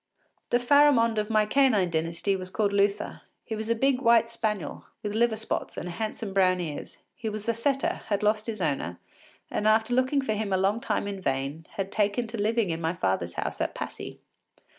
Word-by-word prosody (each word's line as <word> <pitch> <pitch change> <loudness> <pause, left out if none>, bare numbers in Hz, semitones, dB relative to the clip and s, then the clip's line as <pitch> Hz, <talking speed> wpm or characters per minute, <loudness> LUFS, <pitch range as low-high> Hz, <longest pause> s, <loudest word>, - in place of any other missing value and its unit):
” - - -45
The 240 - +4
Pharamond 245 -3 +4
of 210 +1 -2
my 215 -1 +3
canine 215 -7 +3
dynasty 165 +4 0
was 185 -1 -5
called 205 +1 0
Luther. 200 +1 +1 0.2
He 220 - -4
was 220 +1 -4
a 230 - +3
big 265 +2 +2
white 230 -2 +5
spaniel, 210 -8 -3 0.2
with 205 -1 -3
liver 225 0 +2
spots, 220 - -3
and - - -4
handsome 215 +2 -4
brown 185 -2 +3
ears. 155 -4 -5 0.2
He 225 -3 -4
was 215 0 -6
a 230 - +3
setter, 270 +4 0
had 205 -1 0
lost 210 +1 +1
his 215 -5 -3
owner, 135 - -1 0.5
and 210 - 0
after 220 +2 +3
looking 260 +2 +2
for 220 - 0
him 210 -1 -2
a 190 - +3
long 195 +4 +1
time 210 -3 -1
in 200 -1 -5
vain, 140 +1 -2
had 195 0 -3
taken 210 +3 +1
to 225 -2 -3
living 220 -3 +1
in 165 0 -3
my 165 +2 -1
father’s 95 - -1
house - - -3
at - - -1
Passy. - - -6
210 Hz, 205 wpm, -27 LUFS, 185-230 Hz, 0.5 s, white